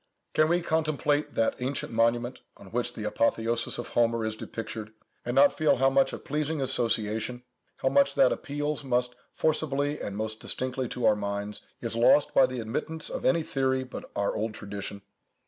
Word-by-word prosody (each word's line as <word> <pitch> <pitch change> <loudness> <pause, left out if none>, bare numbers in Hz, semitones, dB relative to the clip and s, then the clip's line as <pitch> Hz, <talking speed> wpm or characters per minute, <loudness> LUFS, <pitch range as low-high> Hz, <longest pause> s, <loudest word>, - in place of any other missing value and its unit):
Can 155 0 +4
we 175 0 +2
contemplate 155 -2 0
that 115 - +1
ancient 130 +2 -2
monument, 120 +2 +1 0.2
on 95 - -14
which 120 +1 -1
the 110 - -5
"Apotheosis 115 +2 0
of 120 - -5
Homer" 115 -1 +2
is 110 0 -2
depictured, 110 -1 -6 0.3
and 120 +1 -3
not 140 +1 +6
feel 155 - +3
how 135 +1 +4
much 135 0 +3
of - - -8
pleasing 150 +1 -1
association, 115 -2 0 0.3
how - - +1
much 280 0 +3
that - - +5
appeals 145 - -2
most 125 -2 0 0.2
forcibly 145 -2 0
and 100 0 -4
most 110 0 -3
distinctly 130 -1 -2
to 125 - -2
our 105 - +5
minds, 100 0 -4 0.2
is 115 -1 -3
lost 120 +5 +4
by 130 - +6
the 130 -1 -5
admittance 155 +8 -3
of - - -4
any 170 -2 +3
theory 130 -2 0
but 130 - -8
our 100 0 0
old 110 0 -2
tradition? 100 0 -6
125 Hz, 180 wpm, -28 LUFS, 110-145 Hz, 0.3 s, not